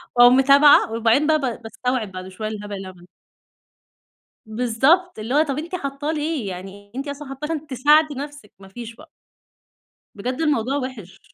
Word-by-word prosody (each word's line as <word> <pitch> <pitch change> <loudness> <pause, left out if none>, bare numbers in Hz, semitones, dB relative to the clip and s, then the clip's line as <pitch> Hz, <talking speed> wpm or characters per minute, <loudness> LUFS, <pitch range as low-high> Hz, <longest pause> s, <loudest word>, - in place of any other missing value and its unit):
وأقوم 245 +1 +7
متابعة 280 -1 +6
وبعدين 230 +6 +2
بقى 315 -1 +4
ب 250 -4 -3
باستوعب 225 0 -3
بعد 185 0 -8
شوية، 190 +3 -6
الهبل 205 -1 -6
اللي 195 -1 -7
أنا - - -8
باعملُه. 175 0 -19 1.4
بالضبط، 250 +10 +1
اللي 225 +4 -4
هو 305 - +5
طَب 280 -3 -3
أنتِ 335 +4 -5
حاطّاه 280 -2 -3
ليه! 305 -6 -2
يعني 195 +3 -9
أنتِ 275 +2 -4
أصلًا 285 0 -7
حاطّاه 270 +2 -6
عشان 310 -1 -4
تساعدي 295 +3 +3
نفسك، 290 -3 -8
ما 195 - -14
فيش 230 +3 -9
بقى. 310 +6 -16 1.1
بجد 250 +8 -4
الموضوع 275 -4 +1
وِحِش. 220 -8 -8
255 Hz, 170 wpm, -22 LUFS, 220-295 Hz, 1.4 s, وأقوم